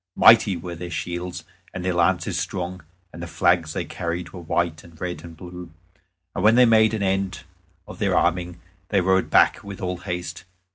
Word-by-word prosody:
Mighty 110 -5 +6
were 85 +1 -7
their 85 +1 -7
shields, 85 +1 -4 0.3
and 90 0 -4
their 90 - +1
lances 85 +1 +1
strong, 90 0 -3 0.3
and 85 - -9
the 85 - -5
flags 85 -2 +1
that - - -2
they - - -5
carried 85 0 -4
were 90 - -9
white 85 -1 -1
and 85 -2 -17
red 90 -1 -4
and 85 -1 -11
blue. 90 -1 -9 0.6
And - - -3
when 110 +2 +6
they 125 0 +7
made 110 -1 +4
an 105 - -2
end 95 0 -1 0.4
of - - -10
their - - +1
arming 85 0 0 0.3
they 100 - +3
rode 95 +1 +2
back - - +4
with 100 -1 -8
all 90 -1 -3
haste. 90 -2 -5
90 Hz, 195 wpm, -23 LUFS, 85-95 Hz, 0.6 s, they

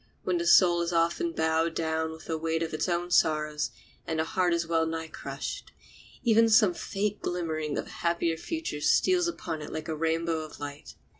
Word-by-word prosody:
When 180 -2 0
the 170 - -1
soul 175 -1 +6
is 170 0 -1
often 170 - +1
bowed 160 - +1
down 160 0 -1
with 160 0 -10
the 160 - -2
weight 165 +1 -1
of 160 - -4
its 155 +3 -1
own 175 0 -1
sorrows 155 -3 +2 0.4
and 160 - -1
the 160 - +2
heart 180 +2 +1
is 170 0 +1
well 165 -1 +1
nigh 160 0 -3
crushed, - - -6 0.5
even 230 -1 +5
then - - +2
some 215 -4 +6
faint 205 +3 -3
glimmering 160 -4 -2
of - - -2
a - - -13
happier 170 -1 +1
future 315 - -4
steals 360 - +3
upon 165 - -4
it 150 - -7
like 155 +1 -5
a 160 - -2
rainbow 165 +1 0
of 155 -1 -8
light. 145 0 -8
165 Hz, 205 wpm, -28 LUFS, 160-175 Hz, 0.5 s, soul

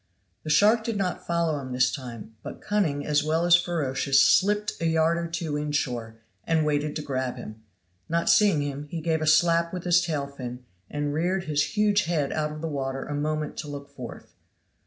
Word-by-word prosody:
The 155 - -6
shark 215 +8 +4
did 225 -2 -2
not 185 -2 -3
follow 170 -3 0
him 130 -2 -6
this 125 0 +3
time, 120 -5 -8
but - - -8
cunning 165 -9 -1
as 150 -1 +2
well 160 +2 +1
as 175 0 +7
ferocious 140 -6 +1
slipped 210 +7 +3
a 165 - +1
yard 160 +1 +2
or 170 - -3
two 165 -3 -3
inshore, 125 -6 -2 0.3
and 160 -2 +1
waited 150 0 0
to 155 - -3
grab 130 -3 -2
him; 110 -2 -9 0.5
not 170 +1 0
seeing 200 -9 +4
him, 145 +1 -5
he 165 - -4
gave 160 0 0
a 155 - -1
slap 170 +1 +4
with 180 -2 -5
his 175 -1 +4
tail 155 -5 -2
fin, 125 -3 -8 0.2
and 145 0 -2
reared 180 +4 0
his 150 +4 -1
huge 210 -1 +3
head 155 -5 0
out 150 -1 -1
of 155 0 -7
water 135 -4 -3
a 145 - -5
moment 150 +1 -2
to - - -5
look 140 -1 -8
forth. 130 -4 -10
155 Hz, 200 wpm, -26 LUFS, 140-170 Hz, 0.5 s, as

